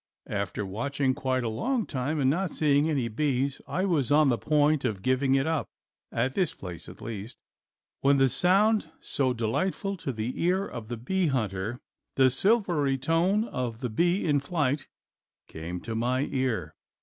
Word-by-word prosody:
After 100 Hz, 0 st, -3 dB
watching 130 Hz, +7 st, -1 dB
quite 130 Hz, -1 st, -1 dB
a -, -, -1 dB
long 230 Hz, -, -1 dB
time 145 Hz, +3 st, -2 dB
and 135 Hz, -, +2 dB
not 175 Hz, +7 st, +1 dB
seeing 150 Hz, 0 st, +2 dB
any 135 Hz, -6 st, 0 dB
bees 135 Hz, +3 st, -1 dB
I 185 Hz, -, -1 dB
was 150 Hz, -10 st, +1 dB
on 150 Hz, -1 st, +5 dB
the 120 Hz, -, +2 dB
point 150 Hz, -1 st, +2 dB
of 105 Hz, -6 st, -2 dB
giving 130 Hz, +1 st, +2 dB
it 135 Hz, 0 st, +2 dB
up, 160 Hz, -2 st, -1 dB, 0.4 s
at 125 Hz, +3 st, 0 dB
this 180 Hz, 0 st, 0 dB
place 90 Hz, -3 st, -8 dB
at 90 Hz, -, -12 dB
least, 110 Hz, 0 st, -6 dB, 0.6 s
when 140 Hz, 0 st, +4 dB
that 135 Hz, -1 st, +4 dB
sound 205 Hz, -, +3 dB
so 130 Hz, -2 st, 0 dB
delightful 185 Hz, -, -1 dB
to 140 Hz, -, -3 dB
the 115 Hz, +1 st, -4 dB
ear 185 Hz, +3 st, +2 dB
of 115 Hz, -3 st, -7 dB
the 120 Hz, +1 st, -4 dB
bee 185 Hz, +10 st, 0 dB
hunter, 110 Hz, -3 st, -2 dB, 0.4 s
the 130 Hz, -1 st, +5 dB
silvery 170 Hz, -, +2 dB
tone 170 Hz, +9 st, +2 dB
of 125 Hz, -, -3 dB
the 125 Hz, -3 st, -2 dB
bee 175 Hz, -, +1 dB
in 145 Hz, -3 st, +3 dB
flight, 145 Hz, -2 st, -1 dB, 0.6 s
came 85 Hz, +3 st, -6 dB
to 115 Hz, -, -5 dB
my 125 Hz, +3 st, 0 dB
ear. 115 Hz, -, -1 dB
135 Hz, 175 wpm, -27 LUFS, 120-160 Hz, 0.6 s, on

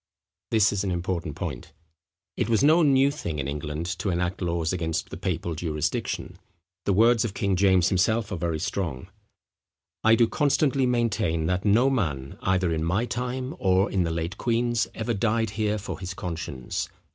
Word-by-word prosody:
This 110 Hz, -2 st, +3 dB
is 100 Hz, -1 st, -1 dB
an 100 Hz, -, -1 dB
important 85 Hz, -3 st, -2 dB
point. -, -, -6 dB, 0.6 s
It 105 Hz, -, -1 dB
was 115 Hz, +2 st, +3 dB
no 160 Hz, +4 st, +6 dB
new 140 Hz, -2 st, +4 dB
thing 85 Hz, -, -4 dB
in 70 Hz, -1 st, -2 dB
England 75 Hz, +3 st, -4 dB
to 100 Hz, -, -1 dB
enact 90 Hz, +1 st, -1 dB
laws 85 Hz, -1 st, -1 dB
against 80 Hz, -3 st, -2 dB
the -, -, -5 dB
papal 85 Hz, -, -2 dB
jurisdiction. 75 Hz, -2 st, -3 dB, 0.5 s
The 100 Hz, -, +2 dB
words 115 Hz, +3 st, +4 dB
of 105 Hz, -4 st, -4 dB
King 100 Hz, -1 st, +1 dB
James 95 Hz, -1 st, +4 dB
himself 105 Hz, +3 st, +1 dB
are -, -, -1 dB
very 85 Hz, -1 st, -1 dB
strong: 90 Hz, -4 st, -3 dB, 0.9 s
"I 110 Hz, +1 st, +6 dB
do 115 Hz, 0 st, +4 dB
constantly 140 Hz, 0 st, +2 dB
maintain, 110 Hz, -9 st, 0 dB
that 90 Hz, +3 st, -1 dB
no 120 Hz, +6 st, +4 dB
man, 75 Hz, -, -2 dB
either 95 Hz, -2 st, +1 dB
in 80 Hz, 0 st, -1 dB
my 95 Hz, +8 st, +1 dB
time, 125 Hz, +2 st, -3 dB
or 95 Hz, +1 st, +2 dB
in 95 Hz, -, +1 dB
the 85 Hz, -, 0 dB
late 85 Hz, +4 st, -3 dB
queen's, 120 Hz, -1 st, +1 dB
ever 115 Hz, +1 st, -1 dB
died 110 Hz, 0 st, 0 dB
here 105 Hz, 0 st, 0 dB
for 100 Hz, -, -6 dB
his 95 Hz, 0 st, -5 dB
conscience. 80 Hz, -9 st, -4 dB
95 Hz, 175 wpm, -26 LUFS, 85-115 Hz, 0.9 s, no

